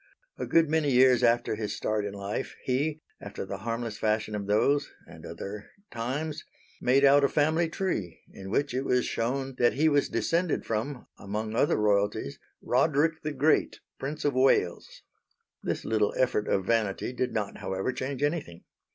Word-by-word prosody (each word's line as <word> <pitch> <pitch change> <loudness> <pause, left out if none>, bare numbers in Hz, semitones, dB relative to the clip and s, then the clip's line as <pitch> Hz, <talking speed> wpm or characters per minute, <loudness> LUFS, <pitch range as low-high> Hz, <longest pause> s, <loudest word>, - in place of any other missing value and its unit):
A - - -3
good 165 -1 +4
many 155 -1 +1
years 130 -1 +5
after 120 -1 +2
his 105 -1 -3
start 105 -1 -1
in 100 - -4
life 100 +5 -4
he, 145 +4 -1 0.2
after 100 -1 -6
the - - -6
harmless 115 -1 -4
fashion 110 0 0
of 100 -1 -4
those 140 +8 +2
(and - - -13
other) 100 +1 -7 0.2
times, 145 +7 -3 0.4
made 135 +3 +4
out 140 +1 +6
a 140 - +4
family 155 +3 +2
tree 110 - -3
in 95 0 -9
which 140 +5 0
it 130 - 0
was 125 -2 +1
shewn 130 +3 -2
that 120 - +4
he 155 +4 +2
was 145 -1 +2
descended 170 0 0
from, 120 +4 -3
among 105 +2 -4
other 140 - +2
royalties, 105 -6 0 0.2
Roderick 155 +5 +2
the 155 - -3
Great, 145 +2 +2 0.2
Prince 145 +3 -4
of 145 - +2
Wales. 130 -9 +1 0.6
This - - -3
little 110 -2 +1
effort 120 -5 +1
of 95 - 0
vanity 110 +1 0
did 125 0 -1
not, 105 -3 -3
however, 95 +6 -2
change 135 +2 -4
anything. 145 - -2
125 Hz, 170 wpm, -28 LUFS, 105-145 Hz, 0.6 s, out